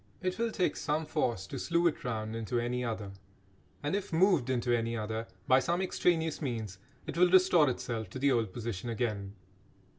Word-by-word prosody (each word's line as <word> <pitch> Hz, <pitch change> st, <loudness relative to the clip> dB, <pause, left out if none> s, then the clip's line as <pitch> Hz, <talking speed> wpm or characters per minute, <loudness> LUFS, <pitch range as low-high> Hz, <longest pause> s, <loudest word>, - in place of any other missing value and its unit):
It 185 Hz, +2 st, -1 dB
will 230 Hz, 0 st, +1 dB
take 185 Hz, -4 st, 0 dB
some 155 Hz, +1 st, -1 dB
force 120 Hz, -, -1 dB
to -, -, -6 dB
slew 170 Hz, 0 st, +1 dB
it 165 Hz, -, +1 dB
round 110 Hz, -2 st, -3 dB
into 115 Hz, +1 st, -1 dB
any 125 Hz, +1 st, -1 dB
other. 110 Hz, -4 st, -3 dB, 0.7 s
And 145 Hz, +6 st, 0 dB
if 200 Hz, -, -3 dB
moved 165 Hz, -6 st, +3 dB
into 120 Hz, -1 st, +1 dB
any 115 Hz, 0 st, -1 dB
other 110 Hz, +1 st, -3 dB, 0.2 s
by 130 Hz, -, +6 dB
some 170 Hz, +6 st, 0 dB
extraneous 165 Hz, -4 st, +1 dB
means 110 Hz, -, -4 dB, 0.3 s
it -, -, -4 dB
will 180 Hz, 0 st, +6 dB
restore 180 Hz, -5 st, +6 dB
itself 115 Hz, -4 st, -3 dB
to 120 Hz, -, -7 dB
the 140 Hz, +1 st, +3 dB
old 115 Hz, -6 st, +1 dB
position 115 Hz, -1 st, -4 dB
again. 105 Hz, -4 st, -2 dB
125 Hz, 185 wpm, -31 LUFS, 110-165 Hz, 0.7 s, by